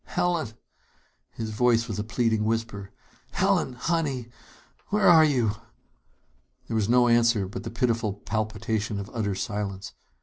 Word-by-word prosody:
"Helen!" 175 -9 -1 0.8
His 110 -1 -6
voice 115 +1 +2
was - - -4
a - - -1
pleading 110 -1 0
whisper. 110 -3 -2 0.4
"Helen, 185 -7 +1
honey, 135 -3 -2 0.6
where 205 -1 +2
are 165 -3 +8
you?" 125 -8 +2 1.2
There 115 - -3
was 110 -1 +1
no 125 0 +5
answer 115 -4 +3
but 95 - -6
the 115 - -6
pitiful 115 -2 0
palpitation 110 +1 -3
of 100 +1 -7
utter 105 -4 -1
silence. 100 -1 -4
115 Hz, 135 wpm, -26 LUFS, 105-125 Hz, 1.2 s, are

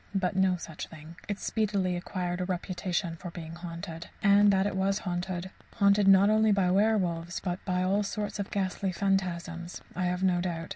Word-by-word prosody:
But 185 -1 0
no 190 -1 +3
such 160 -2 -7
thing. 160 0 -12
It 205 -1 -2
speedily 200 -5 0
acquired 180 0 -3
a - - 0
reputation 180 -1 -2
for 175 - -7
being 165 -1 -8
haunted. 170 0 -7
And 205 0 +6
that 190 0 +2
it 205 - -1
was 195 +1 +1
haunted 180 -1 -3 0.2
haunted 200 -1 +4
not 195 0 +7
only 220 0 +4
by 190 -3 +3
werwolves 185 -4 +1
but 180 -1 -4
by 180 -1 0
all 195 +3 +2
sorts 210 0 -3
of 200 - -3
ghastly 190 -1 -1
phantasms 180 -3 -2 0.2
I 185 - -1
have 180 +1 -1
no 180 -2 +3
doubt. 170 -2 -3
185 Hz, 185 wpm, -29 LUFS, 175-200 Hz, 0.2 s, not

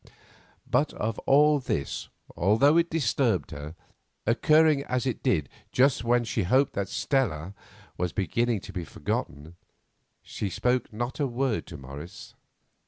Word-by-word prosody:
But - - +1
of 110 +1 -3
all 150 +1 +5
this, 80 - -3 0.3
although 110 - +4
it 170 0 +3
disturbed 120 - 0
her, 75 +3 -7 0.5
occurring 150 +5 +4
as 125 0 -1
it 130 - -2
did 85 - +1 0.2
just 135 -1 +3
when 120 +1 +2
she 110 -1 -1
hoped 130 +9 +2
that 100 -1 -2
Stella 100 - -1 0.5
was 90 -1 0
beginning 115 +2 0
to - - -10
be 90 - -3
forgotten, 75 +1 -4 0.7
she 100 - -4
spoke 125 +7 0
not 120 +6 -4
a 145 - +1
word 125 -1 -1
to 85 - -8
Morris. 70 +5 -10
115 Hz, 140 wpm, -27 LUFS, 90-135 Hz, 0.7 s, all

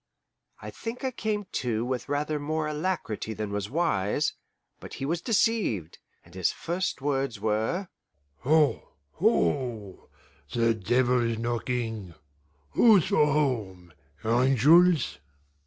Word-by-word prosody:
I - - -6
think 230 +3 -7
I 260 - 0
came 215 -4 -2
to 120 -2 -1
with 125 -1 -3
rather 150 +1 -1
more 155 +2 -2
alacrity 150 - -3
than 105 -1 -4
was 100 0 -3
wise, 145 - 0 0.5
but - - -9
he 135 - -4
was 165 +4 -1
deceived, 200 - 0 0.3
and 85 - -19
his 95 -2 +1
first 175 -4 -3
words 135 -5 -1
were, 110 - -1 0.5
"Ho, 150 +2 +1 0.2
ho! 105 - -1 0.4
the 115 -1 +3
devil's 120 +2 +1
knocking; 115 -5 -3 0.6
who's 215 -7 +5
for 150 - +4
home, 105 - -1 0.3
angels?" 135 +9 +4
130 Hz, 115 wpm, -27 LUFS, 110-160 Hz, 0.6 s, who's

